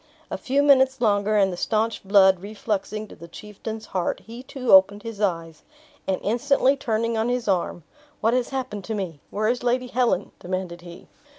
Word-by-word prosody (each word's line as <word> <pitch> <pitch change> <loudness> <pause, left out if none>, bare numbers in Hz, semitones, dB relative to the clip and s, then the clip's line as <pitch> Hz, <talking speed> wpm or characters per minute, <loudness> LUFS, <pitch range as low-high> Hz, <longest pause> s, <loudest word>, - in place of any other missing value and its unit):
A - - -2
few 275 +2 +1
minutes 265 -2 +4
longer, 210 -2 +2
and 195 -2 +3
the - - -6
staunched 220 0 -1
blood 190 -2 +5
refluxing 210 +1 -4
to - - -12
the 170 - -12
chieftain's 215 +4 -8
heart, 180 -2 -2
he 230 +2 -10
too 255 -1 -3
opened 195 +2 +6
his 225 -3 -7
eyes; 165 -5 -2 0.5
and 190 - +1
instantly 265 +5 +2
turning 230 -3 -1
on 225 +2 0
his 245 -2 -2
arm 175 -3 -1 0.4
"What 225 +1 +2
has 250 -1 0
happened 250 -7 -4
to 220 - -3
me? 180 -7 -4
Where 215 +1 -1
is 245 +2 0
Lady 250 +1 0
Helen?" 240 -7 0
demanded 180 -1 -4
he. 175 0 -12
215 Hz, 185 wpm, -24 LUFS, 190-245 Hz, 0.5 s, opened